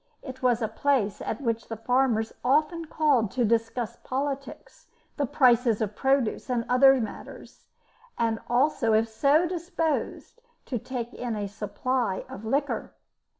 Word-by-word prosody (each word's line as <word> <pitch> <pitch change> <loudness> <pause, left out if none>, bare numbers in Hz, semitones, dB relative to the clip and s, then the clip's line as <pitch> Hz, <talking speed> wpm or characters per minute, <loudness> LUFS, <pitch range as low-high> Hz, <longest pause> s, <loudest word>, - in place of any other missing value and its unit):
It 260 -1 -9
was 245 -2 +2
a - - +1
place 225 -7 0
at 225 - -4
which 230 -3 -2
the 225 - -5
farmers 235 -1 +1
often 305 +6 +2
called 290 -9 +2
to 245 -2 +1
discuss 225 +1 -1
politics, 275 - -5 0.3
the 285 - -1
prices 240 -4 +3
of 210 -2 -2
produce, 265 -4 0
and 240 -2 0
other 270 +1 +6
matters, 220 -3 -8 0.5
and 225 -1 0
also, 240 -2 +2
if 220 +1 +3
so 285 +9 +3
disposed, 340 +5 -3 0.2
to 245 - -3
take 245 0 -5
in 240 -3 -4
a 205 -1 -3
supply 210 +1 -2
of 200 - -9
liquor. 275 +6 -2
250 Hz, 145 wpm, -26 LUFS, 225-275 Hz, 0.5 s, other